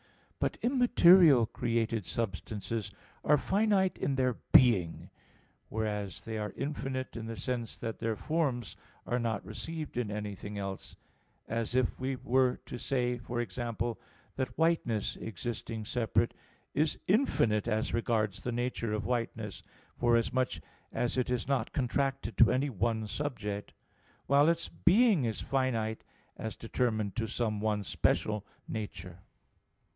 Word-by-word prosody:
But - - 0
immaterial 185 - +6
created 115 -1 -1
substances 105 0 -3 0.3
are 150 - +5
finite 195 +2 +2
in 140 - 0
their 130 -1 +2 0.2
being; 100 -10 +5 0.6
whereas 105 -3 -3
they 110 -1 -3
are 105 -2 -3
infinite 135 -2 -3
in 115 -1 -5
the 115 - -4
sense 120 +2 -3
that 115 - -5
their 115 -1 -1
forms 135 - -1 0.3
are 120 - 0
not 115 -4 -1
received 160 -5 -6
in 120 -4 0
anything 105 0 -5
else; 100 -1 -5 0.5
as 115 +1 -2
if 130 -2 +1
we 130 +1 -1
were 125 0 +2
to 120 - -6
say, 125 -2 0
for 120 +1 -4
example, 120 +1 -3 0.4
that 130 -2 -3
whiteness 160 -10 +1
existing 110 +1 -5
separate 115 0 +1 0.4
is 150 +1 +1
infinite 120 - +2
as 110 -1 0
regards 110 -4 0
the 125 - -1
nature 120 -2 -1
of 105 - -2
whiteness, 115 -5 -2 0.4
forasmuch 120 +2 +2 0.4
as 120 - -1
it 125 -1 0
is 125 -2 -1
not 135 -5 0
contracted 135 -2 -1
to 115 - +7
any 140 +2 +1
one 110 +1 0
subject; 105 -4 -4 0.5
while 140 +3 +5
its 170 0 0
"being" 195 - +4
is 110 -2 -2
finite 115 -5 0 0.3
as 110 +1 -4
determined 110 -3 -1
to 115 -1 -1
some 110 -1 -1
one 105 -1 0
special 105 +1 +1 0.2
nature. 100 -5 -6
120 Hz, 135 wpm, -31 LUFS, 110-130 Hz, 0.6 s, to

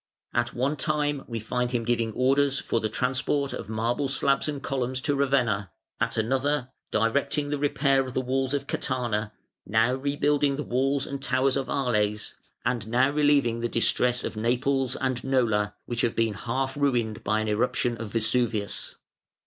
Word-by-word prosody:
At - - 0
one 135 +5 0
time 145 -1 0
we 115 - -4
find 125 +2 -2
him 120 -2 0
giving 115 -1 0
orders 135 +3 +2
for 115 - -1
the 110 - -1
transport 135 +4 0
of 105 - -6
marble 115 +6 0
slabs 140 +2 +2
and 145 -2 -3
columns 130 -1 -1
to 145 0 +1
Ravenna, 125 -8 +1 0.3
at - - -1
another, 130 +3 0 0.2
directing 140 +6 +1
the 145 -1 -1
repair 140 -1 +2
of 130 -1 -6
the - - +2
walls 130 +1 0
of 140 -1 -2
Catana, 110 -6 -1 0.4
now 110 +4 +3
rebuilding 145 +1 +1
the 150 - -3
walls 135 +2 +1
and 140 0 -5
towers 130 0 +1
of 135 -1 -2
Arles, 105 -6 0 0.3
and 115 -4 -1
now 125 +4 +3
relieving 145 -5 +3
the 120 0 -1
distress 125 +1 +2
of - - -4
Naples 125 +3 0
and 130 -2 -2
Nola, 110 -6 +1
which 120 -1 -2
have 115 - 0
been 115 -2 +1
half 130 +6 -2
ruined 120 -7 0
by 110 +2 +1
an 110 - -2
eruption 120 +2 +1
of 110 -3 -6
Vesuvius. 115 -2 0
130 Hz, 170 wpm, -26 LUFS, 115-140 Hz, 0.4 s, now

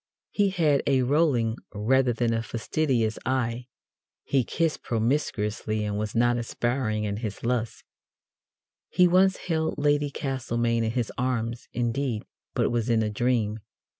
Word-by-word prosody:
He 205 -1 +2
had 160 -7 +2
a 135 -2 +3
rolling 125 -5 +2 0.2
rather 125 +5 +3
than 115 0 0
a 115 - 0
fastidious 115 0 -1
eye. 125 -1 -1 0.6
He 135 -2 +2
kissed 165 +5 -1
promiscuously, 110 -3 -1
and 105 -1 -2
was 105 +1 -3
not 120 +1 +3
aspiring 120 -2 -1
in 100 -1 -2
his 110 -3 -5
lusts. 115 -1 -1 1.1
He 180 - +5
once 185 +2 +4
held 160 -2 -1
Lady 145 0 +2
Castlemaine 120 -4 -1
in 110 - 0
his 120 -3 -1
arms, 120 -2 -2
indeed, 120 -1 -1 0.3
but - - +2
it - - +1
was 120 0 0
in 115 -1 +3
a 105 - -1
dream. 110 -1 0
120 Hz, 145 wpm, -26 LUFS, 110-140 Hz, 1.1 s, He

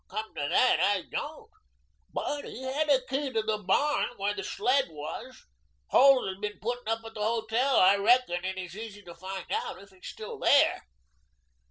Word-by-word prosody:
"Come 215 +2 -5
to 145 - -3
that, 255 - +4
I 200 -2 +2
don't. 310 +8 -6 0.6
But 290 0 -3
he 260 - -8
had 285 +4 -1
a 265 -3 +3
key 270 +1 -2
to 220 -3 0
the 215 -1 -1
barn 210 +10 +1
where 200 +1 -1
the 200 -1 -5
sled 255 +8 +1
was. 155 0 -8 0.4
Holt 270 -3 +6
has 190 0 -5
been 210 0 -4
putting 245 +1 -4
up 225 0 -2
at 225 - -9
the 215 - -7
hotel. 230 +4 +1
I 190 +2 +6
reckon 205 -4 +3
it 190 0 -3
is 180 -1 -7
easy 210 -1 -8
to 175 - -11
find 185 +2 -7
out - - -3
if 200 0 -16
he's 190 -1 -13
still 445 -1 -8
there." 280 - +3
220 Hz, 190 wpm, -28 LUFS, 195-260 Hz, 0.6 s, Holt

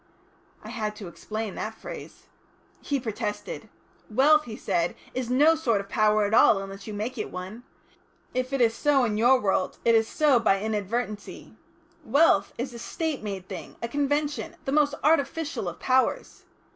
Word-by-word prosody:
I 215 - -9
had 215 -3 -3
to 210 -3 -8
explain 215 +4 -5
that 220 +1 -5
phrase. - - -9 0.6
He 285 -1 -1
protested. 225 - -5 0.4
"Wealth," 295 +7 +4
he 220 - -7
said, 175 -3 -1 0.2
"is 255 -2 -3
no 290 +6 +5
sort 245 -10 +1
of 200 0 -7
power 215 -2 +3
at 205 - -2
all 220 - +6
unless 195 +1 -7
you 215 - -5
make 220 +5 -4
it - - -3
one. 185 +6 -7 0.7
If 255 +1 -2
it 275 -2 0
is 230 -1 +4
so 280 +1 +2
in 215 -3 0
your 245 +4 +5
world 190 -3 0
it 230 - +5
is 225 -1 +4
so 290 -3 +3
by 195 -4 +2
inadvertency. 215 0 -4 0.5
Wealth 285 -9 +3
is 250 +1 -4
a 235 - -8
State 315 +4 -3
made 195 -3 -5
thing, - - -8
a 235 - -3
convention, 290 +4 -1
the 270 - -1
most 290 0 +3
artificial 300 - +1
of 170 - -10
powers. 260 0 0
230 Hz, 170 wpm, -26 LUFS, 210-275 Hz, 0.7 s, all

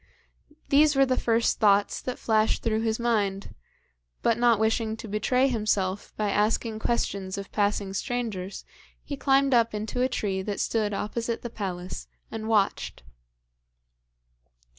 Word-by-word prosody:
These 295 +1 +5
were 270 0 +5
the 255 -1 +1
first 230 -1 +1
thoughts 205 -2 +3
that 255 - -4
flashed 220 -1 +1
through 220 -1 +1
his 225 -1 0
mind; 205 -4 0 0.7
but 230 - +3
not 240 -2 +5
wishing 220 0 0
to 225 - -8
betray 250 +5 +2
himself 210 -5 -1
by 210 -1 0
asking 215 +1 0
questions 200 -5 -1
of 200 0 -7
passing 205 -1 0
strangers, 200 -4 -3 0.4
he 285 - -5
climbed 275 0 +3
up 230 -2 +3
into 215 +4 -3
a 255 - +2
tree 195 -6 -1
that 200 +1 -4
stood 210 -3 0
opposite 230 +3 -3
the 240 - -5
palace 185 -4 -5 0.2
and 220 -1 -5
watched. 205 - 0
220 Hz, 140 wpm, -26 LUFS, 205-235 Hz, 0.7 s, These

